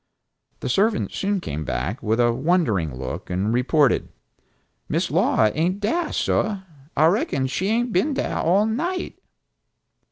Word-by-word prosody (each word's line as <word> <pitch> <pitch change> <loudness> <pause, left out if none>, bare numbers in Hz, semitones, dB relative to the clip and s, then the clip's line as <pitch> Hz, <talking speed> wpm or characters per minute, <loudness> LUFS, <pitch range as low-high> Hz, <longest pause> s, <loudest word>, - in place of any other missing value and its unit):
The - - -3
servant 205 - +1
soon 200 0 -1
came 75 - -4
back, 75 - -3
with 110 0 0
a 120 -1 +4
wondering 120 - +1
look 65 0 -6
and 95 +5 0
reported, 135 +3 +2 0.8
"Miss - - 0
Laura 110 -1 +3
ain't 175 +6 0
dah, 310 +11 0
sah. 205 -2 0 0.4
I 155 - +5
reckon 160 -6 +1
she 130 +9 -2
hain't 235 +2 0
been 275 - +1
dah - - -1
all 190 +5 +3
night!" 340 +12 -3
160 Hz, 140 wpm, -23 LUFS, -, 0.8 s, I